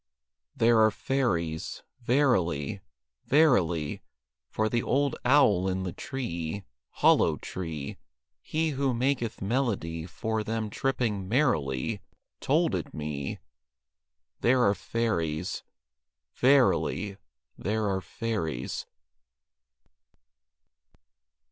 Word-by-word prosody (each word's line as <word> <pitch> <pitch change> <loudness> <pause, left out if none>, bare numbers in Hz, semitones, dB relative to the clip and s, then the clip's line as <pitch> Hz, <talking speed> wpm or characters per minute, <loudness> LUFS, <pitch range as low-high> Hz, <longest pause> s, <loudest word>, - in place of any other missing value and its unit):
There 115 0 +4
are 110 0 +6
fairies; 90 -11 -1 0.2
verily; 115 - +1 0.5
Verily; 90 - +3 0.5
For 110 - 0
the 115 +2 +1
old 140 +1 +1
owl 115 -9 +4
in 95 0 -1
the 90 - -4
tree, 100 - -4 0.3
Hollow - - +4
tree, 80 -6 -5 0.4
He 160 +1 -1
who 135 -2 0
maketh 120 -4 -1
melody 95 -8 -1
For 110 +3 -2
them 110 -1 -3
tripping 110 -8 -1
merrily, 105 - +1 0.4
Told - - +2
it - - -3
me. 75 -2 -4 1.0
There 125 +1 +4
are 100 - +4
fairies. 90 -8 -2 0.7
Verily, 125 - +3 0.4
There 105 +2 -1
are 95 -1 0
fairies. 85 - -3
110 Hz, 90 wpm, -28 LUFS, 85-125 Hz, 1.0 s, are